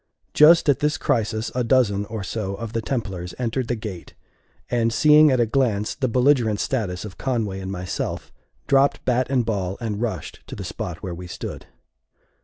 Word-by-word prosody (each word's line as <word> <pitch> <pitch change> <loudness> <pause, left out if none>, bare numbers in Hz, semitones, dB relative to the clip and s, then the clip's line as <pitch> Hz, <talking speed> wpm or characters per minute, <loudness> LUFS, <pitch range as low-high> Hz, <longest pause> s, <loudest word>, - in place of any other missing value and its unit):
Just 160 +2 +6
at 145 -1 +4
this 150 0 +1
crisis 110 -1 -1
a 125 - 0
dozen 115 -5 +2
or 110 -1 -5
so 100 0 -3
of 115 +1 -7
the 115 - -1
Templars 95 -8 -4
entered 125 0 -2
the 120 - 0
gate, 105 -6 -8 0.5
and, 115 -1 +1
seeing 150 +4 +6
at 130 -2 +2
a 120 - +4
glance 110 -4 0
the 130 - -1
belligerent 125 -3 +2
status 100 -8 -2
of 100 -3 -10
Conway 110 -7 -1
and 95 0 -5
myself, 90 -1 -4 0.3
dropped 140 +1 +2
bat 125 0 +1
and 130 -4 +1
ball, 100 -4 -2
and 110 -2 -3
rushed 105 -10 -4
to - - -7
the - - -6
spot 85 +1 -6
where 90 -3 -4
we 90 +1 -8
stood. 85 - -7
115 Hz, 185 wpm, -23 LUFS, 100-130 Hz, 0.5 s, Just